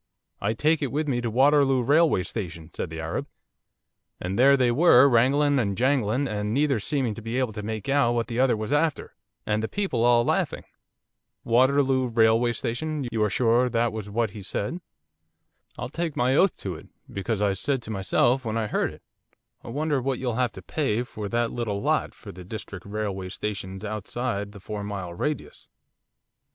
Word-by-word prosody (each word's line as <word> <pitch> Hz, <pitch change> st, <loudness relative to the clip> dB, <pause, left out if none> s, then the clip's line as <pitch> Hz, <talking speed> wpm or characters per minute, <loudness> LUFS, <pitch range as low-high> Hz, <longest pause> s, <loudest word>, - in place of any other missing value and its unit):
"I 100 Hz, +2 st, 0 dB
take 155 Hz, +7 st, +1 dB
it 140 Hz, -, -1 dB
with 150 Hz, +2 st, -1 dB
me 125 Hz, -4 st, 0 dB
to 120 Hz, -, -2 dB
Waterloo 135 Hz, +1 st, +4 dB
Railway 145 Hz, -, +3 dB
Station," 85 Hz, -7 st, -6 dB
said -, -, -4 dB
the 80 Hz, 0 st, -7 dB
Arab, 80 Hz, 0 st, -3 dB, 0.9 s
and 95 Hz, +5 st, -3 dB
there 140 Hz, +2 st, +6 dB
they 125 Hz, -2 st, +3 dB
were, 140 Hz, -1 st, +6 dB
wrangling 140 Hz, +3 st, +3 dB
and 100 Hz, -5 st, -1 dB
jangling, 130 Hz, 0 st, +1 dB
and 105 Hz, 0 st, -2 dB
neither 140 Hz, -4 st, +2 dB
seeming 130 Hz, 0 st, -1 dB
to 115 Hz, -, -9 dB
be 115 Hz, +3 st, -3 dB
able 130 Hz, -4 st, 0 dB
to 105 Hz, -, -5 dB
make 110 Hz, +1 st, -5 dB
out 135 Hz, -4 st, +3 dB
what 115 Hz, -1 st, 0 dB
the 120 Hz, 0 st, -4 dB
other 130 Hz, -3 st, +3 dB
was 110 Hz, +3 st, -4 dB
after, 155 Hz, 0 st, 0 dB, 0.3 s
and 105 Hz, 0 st, 0 dB
the 110 Hz, -, -2 dB
people 190 Hz, -, -1 dB
all 120 Hz, -1 st, +4 dB
laughing.' -, -, 0 dB, 0.8 s
'Waterloo 130 Hz, +2 st, +3 dB
Railway 115 Hz, 0 st, +3 dB
Station, 140 Hz, +5 st, -3 dB
you 110 Hz, -2 st, +1 dB
are 105 Hz, -, +2 dB
sure 120 Hz, +3 st, +2 dB
that 120 Hz, -1 st, 0 dB
was 105 Hz, -2 st, -6 dB
what 115 Hz, 0 st, 0 dB
he 105 Hz, -, -9 dB
said?' 105 Hz, -, -3 dB, 1.0 s
'I'll 125 Hz, -, -5 dB
take 165 Hz, +1 st, -3 dB
my 125 Hz, +2 st, +2 dB
oath 190 Hz, +4 st, +3 dB
to 95 Hz, -, -3 dB
it, 80 Hz, -, -11 dB, 0.3 s
because 100 Hz, +2 st, -2 dB
I 100 Hz, -1 st, +2 dB
said 130 Hz, +6 st, -2 dB
to 110 Hz, -, -6 dB
myself, 120 Hz, +6 st, +1 dB
when 110 Hz, -1 st, -2 dB
I 110 Hz, -, 0 dB
heard 105 Hz, -, -1 dB
it, -, -, -15 dB, 0.6 s
"I -, -, -12 dB
wonder 145 Hz, +2 st, -1 dB
what 130 Hz, 0 st, -1 dB
you'll 125 Hz, -2 st, -2 dB
have 125 Hz, 0 st, 0 dB
to 95 Hz, -, -10 dB
pay 125 Hz, -, -1 dB
for 105 Hz, -4 st, -6 dB
that 120 Hz, +1 st, 0 dB
little 110 Hz, -4 st, -2 dB
lot, -, -, 0 dB
for -, -, -10 dB
the 90 Hz, +1 st, -11 dB
District 95 Hz, -1 st, -8 dB
Railway 100 Hz, -3 st, -3 dB
Station's 95 Hz, 0 st, -5 dB
outside 105 Hz, 0 st, -3 dB
the 100 Hz, -, -12 dB
four 105 Hz, +1 st, -6 dB
mile 100 Hz, -4 st, -5 dB
radius." 150 Hz, -, -4 dB
120 Hz, 190 wpm, -25 LUFS, 105-135 Hz, 1.0 s, there